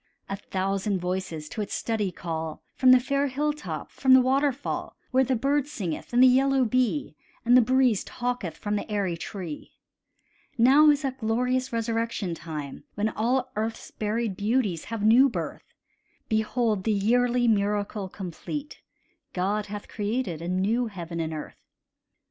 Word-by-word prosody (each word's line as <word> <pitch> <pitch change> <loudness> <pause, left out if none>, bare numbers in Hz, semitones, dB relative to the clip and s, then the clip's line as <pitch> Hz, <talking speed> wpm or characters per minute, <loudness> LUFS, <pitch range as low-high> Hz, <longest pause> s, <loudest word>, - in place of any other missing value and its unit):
A 195 - -3
thousand 195 +1 -1
voices 180 -4 -3
to 215 - -4
its 205 - -3
study 215 -4 -1
call, 160 -3 -5
From 260 - +3
the 255 - +8
fair 275 +3 0
hilltop, 295 +3 -3
from 260 -1 +5
the - - +8
waterfall, 270 +2 0 0.2
Where 260 +1 +4
the 260 0 +1
bird 280 +4 +1
singeth, 185 - -5
and 245 +1 +5
the - - +9
yellow 265 +1 +4
bee, 220 -11 0 0.3
And 240 +1 +6
the 255 - +8
breeze 255 -3 +3
talketh 240 -10 -3
from 210 0 -2
the - - -5
airy 195 -4 0
tree. 170 -2 -7 0.8
Now 275 +6 +7
is 295 0 +3
that 265 -1 -3
glorious 250 +3 0
resurrection 230 -4 -1
time 155 -4 -7
When 210 +1 0
all 250 +4 0
earth's 220 +1 -3
buried 215 -1 -2
beauties 205 -4 0
have 225 -2 -3
new 250 +5 +7
birth: - - -6 0.6
Behold 220 -2 +1
the 220 - +1
yearly 240 +4 +2
miracle 205 -2 0
complete, 210 - -6 0.5
God 200 +3 -1
hath 205 0 -7
created 205 -5 -2
a 170 - -5
new 205 +7 +1
heaven 170 -5 -6
and 160 -1 -2
earth! 155 -1 -7
220 Hz, 155 wpm, -26 LUFS, 190-255 Hz, 0.8 s, the